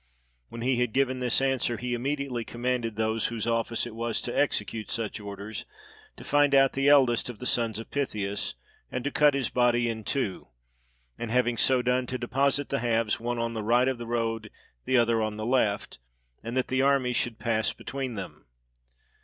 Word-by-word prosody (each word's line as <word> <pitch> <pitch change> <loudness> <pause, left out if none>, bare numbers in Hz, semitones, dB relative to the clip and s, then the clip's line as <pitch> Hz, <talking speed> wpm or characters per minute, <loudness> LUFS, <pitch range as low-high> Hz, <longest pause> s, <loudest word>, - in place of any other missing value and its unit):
When 115 - -7
he 125 0 +1
had 125 -3 0
given 130 -1 +1
this 125 -2 +2
answer, 130 -3 +1
he 125 0 -3
immediately 135 -1 -2
commanded 120 -1 -2
those 110 0 0
whose 115 -2 -3
office 115 0 0
it 120 - -7
was 115 0 -2
to 120 - -4
execute 115 -6 0
such 115 -2 -3
orders, 100 +1 -6 0.5
to - - -10
find 145 -1 +3
out 135 -1 +5
the 135 +1 +1
eldest 130 -5 +4
of 120 - -7
the 125 - -8
sons 115 -3 +1
of 115 - -8
Pythius, 105 - -2 0.4
and 125 - -3
to 145 - -1
cut 150 -1 +4
his 135 -4 -1
body 120 -1 +3
in 110 -1 -3
two; 110 -5 -2 0.7
and 120 - -4
having 120 0 +2
so 125 +2 +3
done, 125 0 +1
to 130 - -2
deposit 135 +3 0
the 140 - 0
halves, 115 -2 +1
one 120 +1 -2
on 115 0 -1
the 110 - -3
right 120 +4 +3
of 130 -2 -1
the 120 - -6
road, 115 -2 -2 0.4
the 130 - +3
other 115 -1 +3
on 110 -1 -2
the 110 - -4
left; 110 - 0 0.4
and 115 +3 -4
that 130 - 0
the 130 +1 +2
army 135 -2 +3
should 120 -1 0
pass 110 0 +1
between 130 -3 -5
them. 95 - -8
120 Hz, 195 wpm, -27 LUFS, 115-130 Hz, 0.7 s, out